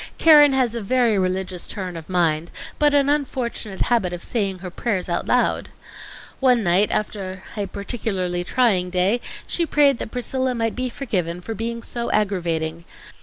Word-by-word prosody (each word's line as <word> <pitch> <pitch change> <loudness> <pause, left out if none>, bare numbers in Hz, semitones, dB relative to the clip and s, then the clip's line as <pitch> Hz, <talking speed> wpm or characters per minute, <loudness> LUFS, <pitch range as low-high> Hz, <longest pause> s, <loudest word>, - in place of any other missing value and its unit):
Keren 295 -3 +7
has 255 -3 +2
a 235 - -3
very 235 +1 +2
religious 185 -1 -2
turn 185 -4 -4
of 165 0 -9
mind, 170 -3 +1 0.3
but 295 -1 +4
an 280 -1 +4
unfortunate 255 -8 -2
habit 225 -7 +1
of 175 - -6
saying 200 -5 -1
her 180 0 -8
prayers 190 -2 -2
out 170 -1 -2
loud. 250 - +1 0.7
One 250 -4 +3
night, 185 +3 +3
after 195 -3 -3
a 205 -2 -2
peculiarly 190 -4 -3
trying 190 -5 +2
day, 190 +6 +1 0.2
she 345 - 0
prayed 285 -5 +3
that - - -4
Priscilla 255 +1 -1
might 225 -1 -1
be 255 0 -2
forgiven 180 -10 -3
for 225 +5 -6
being 230 +2 -4
so 235 -1 -3
aggravating. 170 -5 -1
210 Hz, 165 wpm, -22 LUFS, 180-245 Hz, 0.7 s, Keren